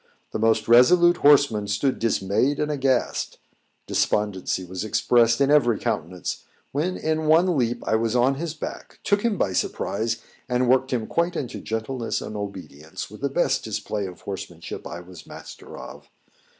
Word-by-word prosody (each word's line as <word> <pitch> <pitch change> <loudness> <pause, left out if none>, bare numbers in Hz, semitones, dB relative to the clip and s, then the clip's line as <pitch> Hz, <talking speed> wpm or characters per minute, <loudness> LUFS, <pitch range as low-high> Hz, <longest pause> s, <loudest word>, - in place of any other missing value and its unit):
The - - -3
most 110 0 +2
resolute 175 +9 +6
horsemen 140 -8 +4
stood 105 +7 0
dismayed 115 +5 +1
and 150 0 0
aghast; 135 -3 0 0.5
despondency 95 -3 0
was 90 +2 -5
expressed 115 +2 +3
in 140 0 +3
every 120 -7 +4
countenance, 90 +3 -3 0.3
when, 165 +6 -1
in 155 0 -1
one 170 +3 +4
leap, 120 -3 0
I 110 - +2
was 115 +1 -1
on 125 +2 +4
his 160 +3 -4
back, 155 - -8
took 205 +1 +2
him 225 -3 0
by 95 - 0
surprise, 110 +5 -1 0.3
and 125 0 +1
worked 130 +2 +3
him 120 -4 -1
quite 170 +6 0
into 125 - -4
gentleness 115 +2 -3
and 110 - -7
obedience 90 -7 -7
with - - -12
the - - 0
best - - +1
display 105 -2 -3
of 90 - -11
horsemanship 95 -4 -7
I 85 - -7
was 90 -1 -13
master - - -11
of. - - -11
120 Hz, 165 wpm, -24 LUFS, 100-145 Hz, 0.5 s, resolute